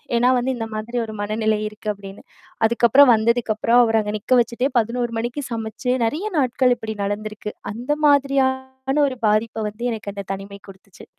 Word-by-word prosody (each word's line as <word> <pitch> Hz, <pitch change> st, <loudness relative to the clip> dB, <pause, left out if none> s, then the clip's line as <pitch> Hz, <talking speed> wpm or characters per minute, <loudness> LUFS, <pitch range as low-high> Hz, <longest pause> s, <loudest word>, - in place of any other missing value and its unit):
ஏன்னா 245 Hz, +2 st, +4 dB
வந்து, 250 Hz, +2 st, 0 dB
"இந்த 225 Hz, -1 st, -4 dB
மாதிரி 220 Hz, +3 st, -4 dB
ஒரு 220 Hz, -, -8 dB
மனநிலை 215 Hz, +1 st, 0 dB
இருக்கு" 215 Hz, 0 st, -7 dB
அப்டின்னு. 195 Hz, 0 st, -12 dB, 0.4 s
அதுக்கப்புறம் 240 Hz, +3 st, +5 dB
வந்ததுக்கப்புறம் 230 Hz, +1 st, +2 dB
அவர 225 Hz, -1 st, +2 dB
அங்க 210 Hz, 0 st, -4 dB
நிக்க 255 Hz, +5 st, +1 dB
வச்சுட்டே 240 Hz, +4 st, -1 dB
11:00 235 Hz, +1 st, -2 dB
மணிக்கு 240 Hz, +5 st, -3 dB
சமைச்சு 225 Hz, +3 st, -2 dB
நெறையா 330 Hz, -, -2 dB
நாட்கள் 250 Hz, -1 st, +2 dB
இப்படி 220 Hz, -1 st, -6 dB
நடந்திருக்கு. 210 Hz, +1 st, -4 dB, 0.2 s
அந்த 245 Hz, +6 st, -4 dB, 0.2 s
மாதிரியான 265 Hz, -1 st, +1 dB
ஒரு 255 Hz, -, -7 dB
பாதிப்ப 215 Hz, +1 st, 0 dB
வந்து 230 Hz, +4 st, -7 dB
எனக்கு 210 Hz, -3 st, -5 dB
அந்த 200 Hz, -1 st, -6 dB
தனிமை 200 Hz, +1 st, -8 dB
குடுத்துச்சு. 190 Hz, -1 st, -15 dB
230 Hz, 160 wpm, -21 LUFS, 215-250 Hz, 0.4 s, அதுக்கப்புறம்